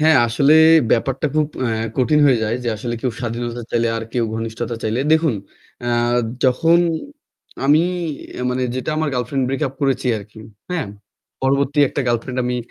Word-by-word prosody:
হ্যাঁ, 155 -1 +5
আসলে 140 +6 +3 0.4
ব্যাপারটা 135 +5 +1
খুব 155 -1 +2 0.2
অ্যা 120 - 0 0.3
কঠিন 150 +4 +3
হয়ে 125 -4 +4
যায় 110 +2 0
যে 120 - -2
আসলে 120 +2 -4
কেউ 125 - -1
স্বাধীনতা 120 0 -4
চাইলে 115 0 +1
আর 115 - -4
কেউ 120 -2 +1
ঘনিষ্ঠতা 115 +1 -4
চাইলে। 110 +3 -1
দেখুন, 160 -6 +3 0.5
অ্যা 120 0 -1 0.5
যখন 165 +7 +4 0.9
আমি 150 +4 +5 0.5
অ্যা 125 - -5
মানে 130 +1 -1
যেটা 130 +4 -3
আমার 155 0 0
গার্লফ্রেন্ড 125 +2 -1
ব্রেক 135 +2 -2
আপ 135 - -14
করেছি 135 -2 0
আরকি। 105 +2 -13 0.3
হ্যাঁ? 170 -6 -1 0.6
পরবর্তী 140 +2 +1
একটা - - -3
গার্লফ্রেন্ড 120 +2 -1
আমি 125 0 -1
125 Hz, 165 wpm, -20 LUFS, 120-140 Hz, 0.9 s, হ্যাঁ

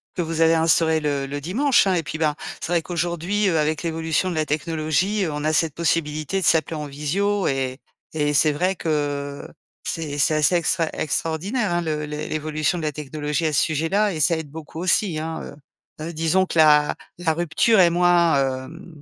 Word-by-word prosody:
que 180 - -1
vous 165 0 -3
avez 165 0 +5
instauré 160 0 +3
le 145 -2 -1
le 145 +1 -5
dimanche, 240 - +2
hein 190 - +2
et 170 - +1
puis, 155 - -5
bah, 155 -2 +1 0.3
c'est - - -4
vrai 170 -1 +2
qu'aujourd'hui, 175 +4 -1
heu, 165 - +1
avec 155 +1 0
l'évolution 165 +1 -1
de - - -4
la 155 -1 0
technologie, 160 +6 0
on 150 -1 -4
a 155 +1 +1
cette 155 0 +1
possibilité 160 +1 -1
de - - 0
s'appeler 160 0 +2
en 150 -1 -4
visio 190 +8 -1
et 130 -1 -1 0.4
et 150 -1 0
c'est 155 +2 +4
vrai 180 +6 0
que 145 -3 -3 0.4
c'est 155 -3 -4
c'est 150 - +3
assez 155 +3 +3
extrai 165 -1 +1
extraordinaire, 175 - -1
hein, 175 - +1
le 155 -2 -2
l'évolution 155 +2 -2
de - - -6
la 155 - -1
technologie 150 +2 -3
à 155 - -2
ce - - +3
sujet-là 165 +7 +1
et 160 - -5
ça 165 +2 +3
aide 160 -2 -6
beaucoup 160 0 -10
aussi, 180 -1 +1
hein, 160 +1 -4
heu, - - -9 0.5
heu, 170 - -6
disons 165 +4 +2
que - - -4
la 150 -1 +5 0.2
la 165 -2 +1
rupture 175 +7 +2
est 175 -2 +6
moins, 165 -7 +2
hem, 165 +1 -13
160 Hz, 200 wpm, -22 LUFS, 150-175 Hz, 0.5 s, est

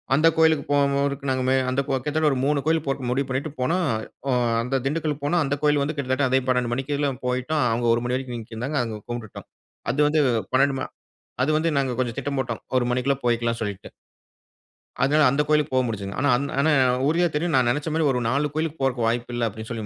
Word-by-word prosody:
அந்த 160 +3 +4
கோயிலுக்கு 160 -2 +3
போகும் 140 -1 +2
போதுக்கு 140 0 -1
நாங்க 130 0 +1
அந்த 130 +2 +1
கோ - - -2
கிட்டத்தட்ட 150 +4 0
ஒரு 135 - 0
மூணு 145 0 +2
கோயில் 160 -1 +1
போட்டு 135 -2 -2
முடிவு 135 +2 0
பண்ணீட்டு 135 +4 -2
போனோம். 170 +6 +1 0.4
ஒ - - +2 0.3
அந்த 130 +3 -1
திண்டுக்கல் 150 0 -2
போனோம் 170 +4 +2
அந்த 140 0 -1
கோவில் 145 -1 +3
வந்து 155 +2 -3
கிட்டத்தட்ட 130 0 0
அதே 130 +1 +3
12 125 -2 +1
மணிக்கேலாம் 140 +1 -2
போய்ட்டோம். 130 +4 0
அவுங்க 120 +1 0
ஒரு 120 +1 0
மணி 125 +1 0
வரைக்கும் 130 -2 -5
நீக்கிருந்தாங்க, 115 +6 -4
அங்க 110 -2 -5
கும்புட்டுட்டோம். 120 -3 -7 0.4
அது 135 - -4
வந்து 155 0 +2 0.3
12 135 +1 +3
ம - - -3 0.6
அது 150 - +1
வந்து 165 +1 +1
நாங்க 135 -2 +1
கொஞ்சம் 120 -3 -1
திட்டம் 140 +1 -3
போட்டோம். 120 -3 -3 0.2
1 120 - +1
மணிக்குள்ள 125 +3 +1
போய்க்கலாம் 120 0 0
சொல்லீட்டு. 100 -3 -5 1.1
அதனால 150 +3 +4
அந்த 140 +3 +1
கோயிலுக்கு 150 -2 +1
போ - - +4
முடிஞ்சதுங்க. 100 -4 -5
ஆனா, 145 - +2
அந் 140 - -2
ஆனா 155 +3 +3 0.3
உறுதியா 170 +4 +2
தெரியும். 165 +1 0
நான் 125 -2 +3
நெனச்ச 145 +4 -1
மாரி 160 - +1
ஒரு 125 - 0
4 145 +4 0
கோயிலுக்கு 160 0 -2
போறக்கு 125 -3 +1
வாய்ப்பு 120 +1 -1
இல்ல, 120 -1 0
அப்பிடின்னு 110 +2 -9
சொல்லி 115 -2 -4
135 Hz, 210 wpm, -24 LUFS, 125-150 Hz, 1.1 s, அந்த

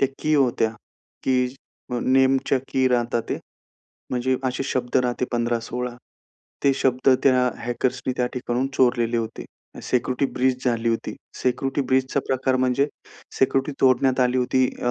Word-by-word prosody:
त्या 135 - +3
की 155 0 +1
होत्या. 125 -5 +2 0.5
कीज 125 0 +1 0.4
अ, 120 - 0
नेमच्या 130 +1 +3
की 130 -1 +2
राहता, 120 -1 +1
ते - - -1 0.7
म्हणजे 130 +1 0
असे 130 +1 -1
शब्द 125 -2 -1
राहते 125 0 0
15-16, 120 +1 -2 0.7
ते 140 - +5
शब्द 130 0 +1
त्या 125 -2 +4
हॅकर्सनी 125 +2 -1
त्या 125 - +1
ठिकाणाहून 125 0 -1
चोरलेले 120 -2 +2
होते. 115 -1 -4 0.4
सिक्युरिटी 130 +2 0
ब्रीच 130 0 0
झाली 115 -1 +1
होती. 115 0 -2 0.3
सिक्युरिटी 135 +2 0
ब्रीचचा 130 +1 +2
प्रकार 130 0 +1
म्हणजे 130 +2 +2 0.5
सिक्युरिटी 135 +2 +2
तोडण्यात 130 0 +3
आली 125 0 +2
होती, 130 +1 +2 0.2
अ, 120 - +1
125 Hz, 140 wpm, -23 LUFS, 120-130 Hz, 0.7 s, ते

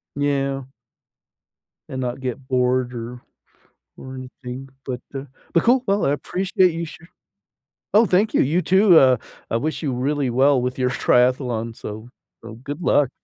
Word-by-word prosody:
Yeah. 140 -1 0 1.3
And 130 - -5
not 125 +1 -3
get 130 0 -5
bored 125 -1 +1
or 120 +1 -7 0.8
or 130 0 -9
anything, 130 0 -8 0.2
but 125 -2 -4
uh, 135 0 -4 0.3
but 170 - +3
cool. 250 +2 +4
Well, 200 +1 +2
I 140 - +2
appreciate 185 +4 +1
you 165 +1 -3
sha 160 +1 -12 0.9
Oh, 220 +2 +6
thank 205 +4 +2
you, - - +4
you 160 +7 +2
too, 190 -1 +6
uh, 130 -2 +5 0.3
I 115 - +2
wish 155 +6 -3
you 135 -4 -1
really 135 0 0
well 135 +2 +4
with 125 +1 -3
your 125 - +2
triathlon, 125 -3 +1
so 110 +3 -8 0.3
so 115 -1 -9
good 145 +7 -7
luck. 145 -5 +3
130 Hz, 160 wpm, -22 LUFS, 125-155 Hz, 1.3 s, Oh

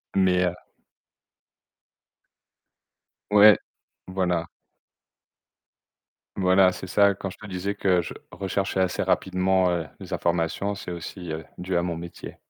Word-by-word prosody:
Mais 90 -1 +3
heu 90 0 -1 2.8
Ouais. 105 0 +8 0.5
Voilà. 90 -3 -1 1.9
Voilà, 95 0 +4
c'est 95 - -8
ça. 100 +1 +4
Quand 100 -1 -5
je - - -11
te 105 - -11
disais 95 +2 -3
que 90 -2 +2
je - - -7 0.2
recherchais 95 0 -1
assez 90 - 0
rapidement, 95 0 +2
heu, 85 -2 -1 0.2
les - - -9
informations, 85 +4 -1
c'est 100 -2 -7
aussi, 85 0 -7
heu, 80 +1 -5
dû 90 0 -2
à - - +2
mon 85 -1 -2
métier. 85 +1 -9
90 Hz, 125 wpm, -25 LUFS, 90-95 Hz, 2.8 s, Ouais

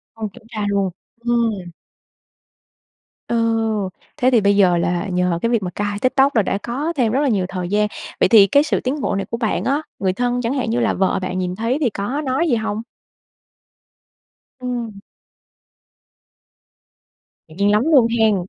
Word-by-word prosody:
Không 220 -1 -4
kiểm - - -15
tra 215 -3 -3
luôn? 200 -2 0 0.3
Ừm. 225 -7 0 1.6
Ồ! 235 - 0 0.8
Thế 255 -3 +3
thì 240 -3 +4
bây 200 0 +3
giờ 185 -3 +4
là 175 +3 -1
nhờ 180 -1 +1
cái 230 - +1
việc 230 -4 +1
mà 180 - -3
cai 205 +2 -3
TikTok 265 +3 +2
là 220 - +5
đã 195 +1 -1
có 280 +8 -2
thêm 230 -4 +1
rất 270 - +2
là 290 - +2
nhiều 195 -6 +1
thời 180 -2 -4
gian. 210 +1 +1 0.3
Vậy - - +5
thì 200 -1 +7
cái 280 +9 +4
sự 305 - 0
tiến 270 +4 -2
bộ - - -1
này 195 0 -2
của 230 - -1
bạn 220 -5 -1
á, 280 +5 0 0.2
người 190 -1 0
thân 245 +3 -1
chẳng 235 +3 -1
hạn 250 -5 -1
như 240 - 0
là 230 - +1
vợ 190 0 +1
bạn 185 0 -3
nhìn 180 0 -2
thấy 230 +5 0
thì 260 -6 +2
có 210 +9 -3
nói 275 +6 0
gì 240 - +2
hông? 220 0 -3 1.8
Ừm. 235 -5 -4 2.5
Ngạc 160 - -15
nhiên 200 +1 +2
lắm 210 +2 +3
luôn 255 -6 +6
hen. 220 -2 +4
220 Hz, 185 wpm, -20 LUFS, 195-245 Hz, 2.5 s, thì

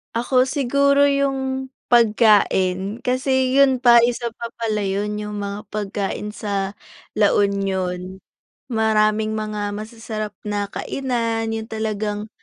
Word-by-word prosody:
Ako 255 +2 +2
siguro 280 +1 +3
yung 265 -1 -1 0.2
pagkain 210 -3 +3
kasi 260 0 +1
yun 265 -2 +4
pa 240 -2 +7
isa 240 0 -2
pa 235 0 -6
pala 215 -3 -1
'yon 205 +2 -2
yung 210 -1 -5
mga 200 +1 -5
pagkain 205 0 -3
sa 200 -1 -3 0.4
La 205 -1 +4
Union. 190 -2 -1 0.5
Maraming 220 -1 +2
mga 210 -1 -3
masasarap 215 0 -6
na 205 -1 -2
kainan 230 -3 -2
yung 220 0 -4
talagang, 215 -1 -3
215 Hz, 115 wpm, -21 LUFS, 205-245 Hz, 0.5 s, pa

